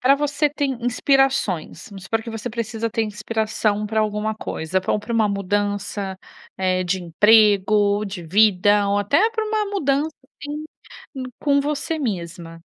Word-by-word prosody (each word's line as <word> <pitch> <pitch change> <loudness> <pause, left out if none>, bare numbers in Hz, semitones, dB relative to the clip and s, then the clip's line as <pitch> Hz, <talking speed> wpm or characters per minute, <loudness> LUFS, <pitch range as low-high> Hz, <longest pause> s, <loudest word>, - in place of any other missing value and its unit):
pra 265 +2 +5
você 295 +1 +1
tem 285 -2 -1
inspirações. 255 - +1
Vamos 195 -2 -10
supor 225 +2 -1
que 230 - -7
você 225 +2 -5
precisa 230 0 -3
ter 225 - 0
inspiração 215 -1 -1
para 220 +1 0
alguma 215 0 -1
coisa, 185 -3 -3
pra 190 - 0
pra 210 +3 -6
uma 220 -2 +3
mudança, 200 0 -2 0.4
eh, 185 -1 +1
de 180 +1 -1
emprego, 205 +2 +4
de 190 -2 -6
vida 205 +2 +4
ou 200 0 +2
até 285 - +3
pra 445 -1 -2
uma 430 -1 -1
mudança, 305 -6 0
assim, 295 +2 -8 0.5
em 265 - -4 0.2
com 280 -1 +3
você 300 +2 -2
mesma. 170 - -5
215 Hz, 155 wpm, -22 LUFS, 200-270 Hz, 0.5 s, pra